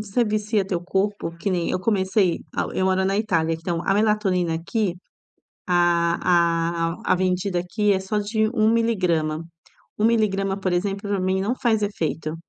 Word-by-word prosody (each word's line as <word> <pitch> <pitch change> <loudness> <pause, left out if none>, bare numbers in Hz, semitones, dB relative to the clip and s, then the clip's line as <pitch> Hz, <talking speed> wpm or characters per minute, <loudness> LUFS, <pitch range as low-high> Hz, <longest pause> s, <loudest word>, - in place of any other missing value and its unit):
se 205 -2 -9
você 240 0 +3
vicia 210 0 0
o - - -8
teu 175 -3 -2
corpo 195 0 -1
Que 195 +4 -2
nem, 175 -2 0
eu - - 0
comecei, 190 -3 +1 0.2
ah, - - 0
eu 185 - 0
moro 190 0 +2
na 195 +1 +1
Itália, 165 -7 +1
então 165 +1 -3
a 195 - +3
melatonina 200 -5 +1
aqui, 180 +3 -1 0.7
a 170 -1 +2
a - - 0
a - - +3
vendida 185 0 0
aqui, 205 +4 0
é 190 - 0
só 190 +3 -3
de 215 +1 0
1 220 -3 +3
miligrama. 180 -9 0 0.6
1 210 - +1
miligrama, 195 -4 +1
por 185 -2 -1
exemplo, 195 +3 -2
pra 200 -2 0
mim 185 +1 0
não 220 +6 0
faz 225 -5 +1
efeito. 160 -6 -2
190 Hz, 185 wpm, -23 LUFS, 175-210 Hz, 0.7 s, você